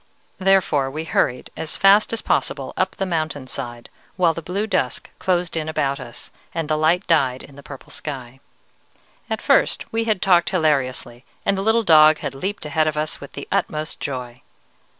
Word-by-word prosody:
"Therefore 185 Hz, -8 st, +3 dB
we 155 Hz, +4 st, -4 dB
hurried 125 Hz, -5 st, 0 dB
as 155 Hz, -, -5 dB
fast 200 Hz, +2 st, +5 dB
as 230 Hz, -, -4 dB
possible 135 Hz, -2 st, -1 dB
up 185 Hz, 0 st, 0 dB
the 195 Hz, -, -2 dB
mountain 155 Hz, -6 st, -2 dB
side, 120 Hz, -2 st, -7 dB, 0.3 s
while 175 Hz, -3 st, +3 dB
the 165 Hz, -, -6 dB
blue 190 Hz, +6 st, -2 dB
dusk 130 Hz, -, -2 dB
closed 180 Hz, -2 st, 0 dB
in 160 Hz, -1 st, -2 dB
about 140 Hz, -3 st, -1 dB
us, 120 Hz, -2 st, -10 dB, 0.2 s
and 165 Hz, -2 st, -2 dB
the 155 Hz, -, +1 dB
light 160 Hz, +4 st, +2 dB
died 135 Hz, -6 st, +2 dB
in 140 Hz, -, -14 dB
the 140 Hz, -, -11 dB
purple 135 Hz, -1 st, -11 dB
sky. 135 Hz, -3 st, -7 dB, 0.9 s
At -, -, -3 dB
first -, -, +3 dB
we 225 Hz, 0 st, 0 dB
had 215 Hz, -4 st, +1 dB
talked 175 Hz, -3 st, +4 dB
hilariously, 135 Hz, -7 st, 0 dB, 0.2 s
and 200 Hz, -, +2 dB
the 195 Hz, -, -2 dB
little 220 Hz, +3 st, +3 dB
dog 155 Hz, -4 st, +7 dB
had 140 Hz, -3 st, -5 dB
leaped 190 Hz, +7 st, -4 dB
ahead 155 Hz, +1 st, +1 dB
of 155 Hz, -1 st, -1 dB
us 155 Hz, 0 st, -3 dB
with 140 Hz, -, -10 dB
the 140 Hz, -, -7 dB
utmost 155 Hz, +1 st, -2 dB
joy. 125 Hz, -3 st, -5 dB
155 Hz, 185 wpm, -22 LUFS, 135-180 Hz, 0.9 s, dog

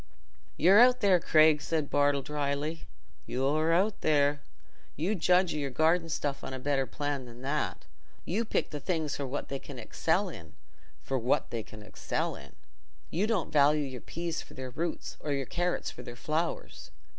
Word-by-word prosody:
"You're 190 Hz, +6 st, +6 dB
out 250 Hz, +1 st, +6 dB
there, 195 Hz, -4 st, +5 dB
Craig," 155 Hz, -2 st, +5 dB
said 155 Hz, -3 st, -2 dB
Bartle, 145 Hz, -1 st, +3 dB
dryly; 150 Hz, +2 st, -2 dB, 0.4 s
"you're 150 Hz, +5 st, +1 dB
out 195 Hz, +5 st, +2 dB
there. 145 Hz, -1 st, +2 dB, 0.5 s
You 175 Hz, +9 st, 0 dB
judge 180 Hz, -2 st, +3 dB
o' -, -, -3 dB
your 140 Hz, -1 st, -2 dB
garden 160 Hz, +5 st, +2 dB
stuff 140 Hz, -2 st, -2 dB
on 130 Hz, -, -5 dB
a -, -, -6 dB
better 135 Hz, 0 st, 0 dB
plan 145 Hz, -3 st, -3 dB
than 120 Hz, +1 st, -12 dB
that. 140 Hz, +1 st, -2 dB, 0.4 s
You 205 Hz, +7 st, 0 dB
pick 220 Hz, -, -1 dB
the 150 Hz, -, -4 dB
things 155 Hz, 0 st, -1 dB
for 140 Hz, -, -3 dB
what 135 Hz, +3 st, -4 dB
they 135 Hz, -, -3 dB
can 140 Hz, -1 st, -10 dB
excel 115 Hz, -, 0 dB
in—for 135 Hz, -1 st, -8 dB
what 120 Hz, +2 st, 0 dB
they 115 Hz, -, -2 dB
can 105 Hz, 0 st, -12 dB
excel -, -, -3 dB
in. -, -, -12 dB, 0.6 s
You 190 Hz, +6 st, +1 dB
don't 215 Hz, -8 st, -1 dB
value 150 Hz, +1 st, +5 dB
your 130 Hz, -2 st, -7 dB
peas 170 Hz, -1 st, -4 dB
for -, -, -14 dB
their 130 Hz, -1 st, -6 dB
roots, 165 Hz, +5 st, -4 dB
or 150 Hz, -, -2 dB
your 135 Hz, -1 st, -1 dB
carrots 175 Hz, +6 st, -1 dB
for -, -, -10 dB
their 120 Hz, -1 st, -9 dB
flowers. 155 Hz, +6 st, -3 dB
150 Hz, 180 wpm, -30 LUFS, 135-165 Hz, 0.6 s, You're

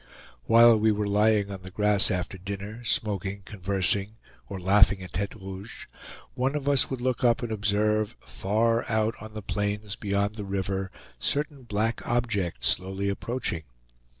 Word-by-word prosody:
While 115 Hz, 0 st, +7 dB
we 110 Hz, +1 st, +4 dB
were 105 Hz, 0 st, 0 dB
lying 105 Hz, 0 st, +3 dB
on 95 Hz, -1 st, -6 dB
the 95 Hz, -, -9 dB
grass 105 Hz, +1 st, +2 dB
after 90 Hz, +1 st, -2 dB
dinner, 100 Hz, +4 st, -6 dB
smoking, 100 Hz, -3 st, -1 dB
conversing, 100 Hz, +1 st, -1 dB, 0.3 s
or 100 Hz, -2 st, -5 dB
laughing 100 Hz, +1 st, +4 dB
at 90 Hz, -, -10 dB
Tete 100 Hz, +2 st, -2 dB
Rouge, 95 Hz, +2 st, -8 dB, 0.5 s
one 130 Hz, +3 st, 0 dB
of 145 Hz, -2 st, -3 dB
us 140 Hz, -2 st, +3 dB
would 130 Hz, -2 st, -4 dB
look 130 Hz, 0 st, -1 dB
up 120 Hz, 0 st, +3 dB
and 120 Hz, -, -3 dB
observe, 105 Hz, +1 st, +1 dB
far 115 Hz, +4 st, 0 dB
out 110 Hz, 0 st, +1 dB
on 110 Hz, 0 st, -10 dB
the 105 Hz, -, -5 dB
plains 105 Hz, +1 st, -2 dB
beyond 100 Hz, +1 st, -1 dB
the 105 Hz, -, -4 dB
river, 95 Hz, 0 st, -2 dB, 0.3 s
certain 145 Hz, -, -1 dB
black 110 Hz, +1 st, -1 dB
objects 100 Hz, -, 0 dB
slowly 95 Hz, +2 st, 0 dB
approaching. 100 Hz, -4 st, -3 dB
105 Hz, 155 wpm, -27 LUFS, 95-110 Hz, 0.5 s, While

